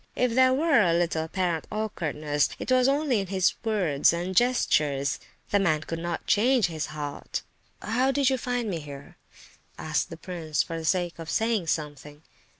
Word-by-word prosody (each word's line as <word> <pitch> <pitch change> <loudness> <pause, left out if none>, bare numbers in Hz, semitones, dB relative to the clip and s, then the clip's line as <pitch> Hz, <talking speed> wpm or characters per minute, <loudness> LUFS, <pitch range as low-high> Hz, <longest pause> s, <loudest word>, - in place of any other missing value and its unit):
If 250 -2 +1
there 260 +1 +5
were 285 -1 +4
a 170 -4 +3
little 170 -2 0
apparent 175 -1 -2
awkwardness, 155 -9 -1
it - - -4
was 255 0 +4
only 280 -4 +2
in 195 - -3
his 190 0 +2
words 185 -11 +2
and 175 +3 -3
gestures. 150 - +2 0.3
The 205 - +4
man 155 -6 +2
could 165 +1 -5
not 170 0 -4
change 240 +1 +3
his 160 -2 -3
heart. 150 -2 -5 0.4
"How 250 +5 +1
did 275 0 +2
you—find 245 -2 0
me 175 -5 -2
here?" 145 -2 -11 0.6
asked 155 -1 -1
the 165 - -8
prince 165 -3 -2
for 165 - -6
the 165 -1 -5
sake 175 0 0
of 165 -1 -7
saying 220 -4 0
something. 150 -1 -4
175 Hz, 170 wpm, -26 LUFS, 155-230 Hz, 0.6 s, there